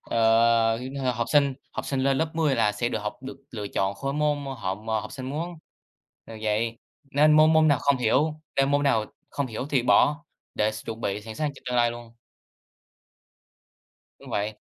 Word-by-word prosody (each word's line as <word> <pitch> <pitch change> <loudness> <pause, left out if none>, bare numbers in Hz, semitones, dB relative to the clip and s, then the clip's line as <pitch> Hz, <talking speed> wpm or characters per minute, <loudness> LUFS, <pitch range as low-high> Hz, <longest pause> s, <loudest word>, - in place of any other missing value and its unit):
ờ, 115 0 +3 0.4
học 115 0 -1
sinh 140 -3 +3 0.2
học - - -4
sinh 135 -1 -1
lên 135 0 +2
lớp 160 0 -1
10 155 -4 +2
là 105 -3 +2
sẽ 120 +4 -1
được - - -2
học, 105 0 -4
được 135 +1 -7
lựa 105 -4 -5
chọn 95 0 -1
khối 135 +7 -3
môn 150 0 +1 0.2
họ 95 -3 -2 0.3
học 110 - -9
sinh 130 -2 -7
muốn, 165 +4 -4 0.7
ờ, 115 - -10
vậy 115 +2 -1 0.3
nên 150 +2 +5
môn 155 +1 +6
môn 155 0 +5
nào 145 - +4
không 140 -1 +2
hiểu 145 +6 +1 0.2
nên 135 0 +3
môn 145 0 +2
nào 115 -6 +2 0.3
không 140 - -2
hiểu 125 +2 -5
thì 135 -4 +2
bỏ 150 +6 +3 0.3
để 110 0 +1
s 110 - -8
chuẩn 115 0 -6
bị 100 -1 -2
sẵn 110 0 -8
sàng 150 +3 -1
cho - - -14
tương 125 -1 -1
lai 120 0 +4
luôn. 120 -1 -10 2.0
Đúng - - -13
vậy. 105 +1 -2
125 Hz, 195 wpm, -26 LUFS, 110-145 Hz, 2.0 s, môn